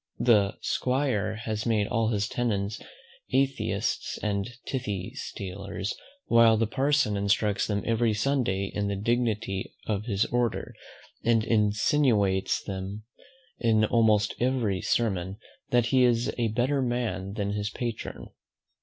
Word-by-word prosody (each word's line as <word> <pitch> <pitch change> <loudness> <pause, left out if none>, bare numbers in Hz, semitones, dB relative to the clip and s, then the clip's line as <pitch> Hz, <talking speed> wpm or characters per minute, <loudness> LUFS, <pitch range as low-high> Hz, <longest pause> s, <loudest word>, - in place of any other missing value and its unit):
The 105 -4 +3
'squire 125 -6 0
has 110 0 -3
made 110 -3 +2
all 115 +1 0
his 105 -1 0
tenants 110 -4 -2 0.5
atheists 135 +1 0
and 100 0 -1 0.2
tithe 105 -8 -3
stealers; 100 +1 -5 0.3
while 115 -1 +5
the 115 - +2
Parson 130 -1 +1
instructs 100 +1 +1
them 100 -1 -1
every 115 -1 +2
Sunday 105 -5 0
in 105 -1 -1
the 100 - -1
dignity 105 -2 -1
of 105 -1 -2
his 100 -3 +1
order, 120 -2 -1 0.5
and 115 -1 +3
insinuates 105 -2 +2
to - - -5
them 95 +2 -5 0.6
in 110 -2 +3
almost 110 -2 +3
every 120 -7 0
sermon, 95 -4 0 0.3
that 120 -1 +3
he 130 -1 +6
is 120 -1 +2
a 120 -2 0
better 125 +6 +1
man 120 -6 -2
than 100 -2 -2
his 105 0 -2
patron. 120 -1 -5
110 Hz, 130 wpm, -27 LUFS, 100-120 Hz, 0.6 s, he